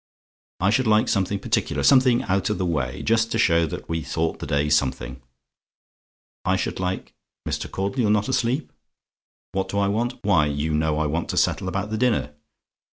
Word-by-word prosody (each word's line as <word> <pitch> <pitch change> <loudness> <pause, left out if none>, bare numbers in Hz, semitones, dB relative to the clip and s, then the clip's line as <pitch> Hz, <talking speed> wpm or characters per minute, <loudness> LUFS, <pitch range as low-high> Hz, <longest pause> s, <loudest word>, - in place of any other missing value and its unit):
I 95 +3 +2
should 130 +2 +2
like 110 0 +4
something 100 0 0
particular - - -1
something 130 -3 +5
out 95 +1 0
of 105 - -1
the 95 - -1
way 70 -7 -2
just 115 0 +2
to - - 0
show 85 -6 +3
that - - -7
we 80 0 -2
thought 80 +2 -2
the - - -6
day 70 0 +1
something. 65 -3 0 1.2
I - - +2
should - - -3
like 95 0 -3 0.3
Mr. - - -3
Caudle, 100 +7 -3
you're 110 -4 +2
not 105 0 +2
asleep? 130 +2 -1 0.8
"WHAT 95 0 -2
DO 100 - -3
I 100 0 +2
WANT? 120 +5 0
"Why, 90 -8 +3
you 75 +2 -2
know 75 0 +1
I 80 - 0
want 80 +3 -2
to - - -3
settle - - +1
about 100 +3 -3
the 110 - -2
dinner. 115 -12 +1
95 Hz, 190 wpm, -23 LUFS, 80-110 Hz, 1.2 s, something